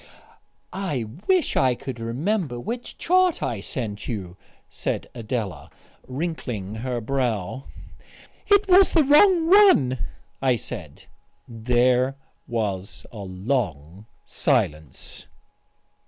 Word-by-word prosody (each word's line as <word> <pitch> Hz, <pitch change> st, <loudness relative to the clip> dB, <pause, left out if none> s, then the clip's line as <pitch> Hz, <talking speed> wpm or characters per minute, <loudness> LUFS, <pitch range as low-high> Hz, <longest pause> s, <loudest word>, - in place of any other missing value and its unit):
"I 185 Hz, -10 st, -2 dB, 0.2 s
wish 370 Hz, -3 st, +2 dB
I 130 Hz, -2 st, +3 dB
could 125 Hz, -1 st, -7 dB
remember 135 Hz, -, -2 dB
which 240 Hz, -, -6 dB
chart 365 Hz, 0 st, +2 dB
I 115 Hz, -, -2 dB
sent 105 Hz, 0 st, -5 dB
you," 95 Hz, -7 st, -5 dB, 0.3 s
said -, -, -3 dB
Adela, 115 Hz, -4 st, -4 dB, 0.4 s
wrinkling 130 Hz, -, -4 dB
her 125 Hz, -1 st, -2 dB
brow. 125 Hz, -1 st, -2 dB, 0.8 s
"It 405 Hz, 0 st, +4 dB
was 380 Hz, +1 st, +6 dB
the 320 Hz, -, +5 dB
wrong 325 Hz, +4 st, +5 dB
one," 340 Hz, -, +6 dB, 0.4 s
I 130 Hz, -2 st, +3 dB
said.... 115 Hz, -, -8 dB, 0.4 s
There 125 Hz, +3 st, +2 dB, 0.3 s
was 100 Hz, -6 st, -3 dB
a 110 Hz, -, -9 dB
long 95 Hz, -, -3 dB, 0.2 s
silence. 75 Hz, -3 st, -2 dB
125 Hz, 100 wpm, -24 LUFS, -, 0.8 s, was